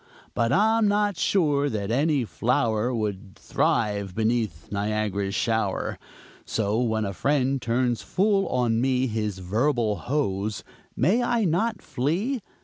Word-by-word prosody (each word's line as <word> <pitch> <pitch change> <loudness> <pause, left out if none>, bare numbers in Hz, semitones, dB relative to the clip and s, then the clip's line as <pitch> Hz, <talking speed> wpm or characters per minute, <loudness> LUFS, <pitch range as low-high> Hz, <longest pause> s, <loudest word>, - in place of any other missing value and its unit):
But 115 0 +1
I'm 220 +2 +3
not 205 -1 +1
sure 145 -6 +2
that 105 -2 -3
any 140 0 +2
flower 115 0 0
Would 105 -4 -4
thrive 100 -3 -1
beneath 110 -7 -1
Niagara's 100 -1 -1
shower! 110 -4 -1 0.4
So 110 0 -1
when 110 -3 0
a 100 - -3
friend 135 +3 +1
turns 120 0 0
full 195 0 +1
on 120 -2 +1
me 130 0 +2
His 105 -4 -2
verbal 110 +3 0
hose, 105 -7 -2 0.3
may 190 - +2
I 240 -2 +1
not 190 +6 0
flee? 190 - -1
120 Hz, 130 wpm, -25 LUFS, 105-150 Hz, 0.4 s, I'm